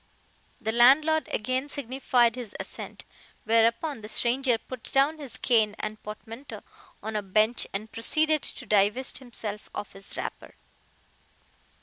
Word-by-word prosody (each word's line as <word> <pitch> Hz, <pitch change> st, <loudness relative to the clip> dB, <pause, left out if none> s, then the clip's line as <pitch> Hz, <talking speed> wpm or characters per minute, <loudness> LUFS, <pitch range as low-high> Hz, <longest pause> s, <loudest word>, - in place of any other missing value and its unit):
The 220 Hz, -3 st, -1 dB
landlord 285 Hz, +7 st, +5 dB
again 255 Hz, +6 st, -1 dB
signified 255 Hz, -3 st, +2 dB
his 240 Hz, -4 st, -7 dB
assent, -, -, -7 dB, 0.4 s
whereupon 230 Hz, +5 st, +2 dB
the 210 Hz, -, -8 dB
stranger 245 Hz, +1 st, +2 dB
put 255 Hz, +1 st, -9 dB
down 285 Hz, +4 st, +3 dB
his 280 Hz, -5 st, -6 dB
cane 220 Hz, -4 st, +3 dB
and 215 Hz, 0 st, -5 dB
portmanteau 225 Hz, +5 st, -8 dB, 0.4 s
on 220 Hz, 0 st, -4 dB
a 210 Hz, -, +1 dB
bench 215 Hz, +4 st, +2 dB
and 215 Hz, +3 st, -5 dB
proceeded 310 Hz, +6 st, +1 dB
to -, -, -5 dB
divest 210 Hz, +6 st, +2 dB
himself 220 Hz, -5 st, -5 dB
of 205 Hz, -, -5 dB
his 195 Hz, 0 st, -6 dB
wrapper. -, -, -6 dB
235 Hz, 130 wpm, -27 LUFS, 215-265 Hz, 0.4 s, landlord